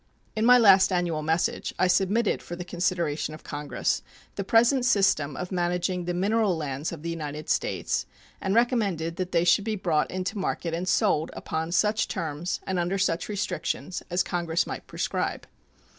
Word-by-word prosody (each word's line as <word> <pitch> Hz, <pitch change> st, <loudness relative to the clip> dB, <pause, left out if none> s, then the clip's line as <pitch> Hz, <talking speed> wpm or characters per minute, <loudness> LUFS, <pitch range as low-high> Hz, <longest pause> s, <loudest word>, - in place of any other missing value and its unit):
In 220 Hz, +1 st, +2 dB
my 250 Hz, 0 st, +9 dB
last 195 Hz, -4 st, +6 dB
annual 175 Hz, -4 st, 0 dB
message 160 Hz, +2 st, -1 dB
I -, -, +3 dB
submitted 195 Hz, +4 st, +2 dB
for 175 Hz, -, -7 dB
the 175 Hz, 0 st, -7 dB
consideration 170 Hz, -4 st, -1 dB
of 155 Hz, -, -14 dB
Congress 145 Hz, -1 st, -2 dB, 0.3 s
the 200 Hz, -, -3 dB
present 235 Hz, +5 st, +4 dB
system 190 Hz, -, +2 dB
of 180 Hz, -, -5 dB
managing 180 Hz, 0 st, -1 dB
the 175 Hz, 0 st, -2 dB
mineral 200 Hz, 0 st, +1 dB
lands 145 Hz, -1 st, -3 dB
of 160 Hz, -3 st, -8 dB
the 170 Hz, -, -2 dB
United 150 Hz, -2 st, -5 dB
States, -, -, -1 dB, 0.3 s
and 195 Hz, +1 st, 0 dB
recommended 200 Hz, -9 st, +1 dB
that 185 Hz, 0 st, -3 dB
they 170 Hz, -, +3 dB
should 175 Hz, +3 st, +4 dB
be 220 Hz, 0 st, -1 dB
brought 165 Hz, -6 st, 0 dB
into 185 Hz, +3 st, -3 dB
market 170 Hz, -3 st, -2 dB
and 175 Hz, +2 st, -2 dB
sold 185 Hz, -6 st, +2 dB
upon 160 Hz, +1 st, -3 dB
such 210 Hz, +4 st, +2 dB
terms 165 Hz, -1 st, -3 dB
and 185 Hz, -1 st, -1 dB
under 175 Hz, +3 st, 0 dB
such 180 Hz, -2 st, 0 dB
restrictions 185 Hz, -3 st, -3 dB
as 180 Hz, +1 st, +1 dB
Congress 170 Hz, -1 st, -1 dB
might -, -, -7 dB
prescribe. -, -, -2 dB
180 Hz, 175 wpm, -26 LUFS, 165-195 Hz, 0.3 s, my